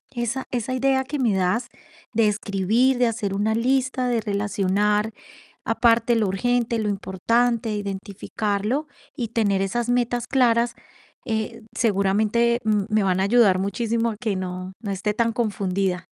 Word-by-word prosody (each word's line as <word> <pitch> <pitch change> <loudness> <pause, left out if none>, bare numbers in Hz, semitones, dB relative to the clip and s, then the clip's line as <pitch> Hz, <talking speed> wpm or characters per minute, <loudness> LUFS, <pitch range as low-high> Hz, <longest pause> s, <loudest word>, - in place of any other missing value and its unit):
esa 240 +2 -2
esa 250 +1 -2
idea 265 +1 +2
que 285 +2 -4
me 225 -6 +2
das, 190 +6 0 0.5
de 220 -1 +3
escribir, 210 +5 +1
de 245 -1 +3
hacer 215 -4 -2
una 210 +2 0
lista, 255 +1 +1
de 235 -2 +1
relacionar 205 +1 0 0.5
aparte, 230 +1 +3
lo 215 -3 +1
urgente, 235 +4 0
lo 210 -1 -1
importante, 225 +4 0
identificarlo. 205 +5 -3 0.3
Y 235 -4 -3
tener 200 -4 +1
esas 235 +5 -1
metas 245 -1 0
claras, 235 -2 +2 0.5
eh, 220 -1 -3
seguramente, 220 +3 +2
mm, 210 -2 +2
me 215 -1 +2
van 185 -1 +1
a - - +2
ayudar 200 -3 +4
muchísimo, 230 +3 -1
que 215 -5 -1
no 185 0 -5
no 205 -3 -4
esté 205 +2 -1
tan 230 +1 0
confundida. 195 -5 -1
220 Hz, 145 wpm, -23 LUFS, 200-240 Hz, 0.5 s, ayudar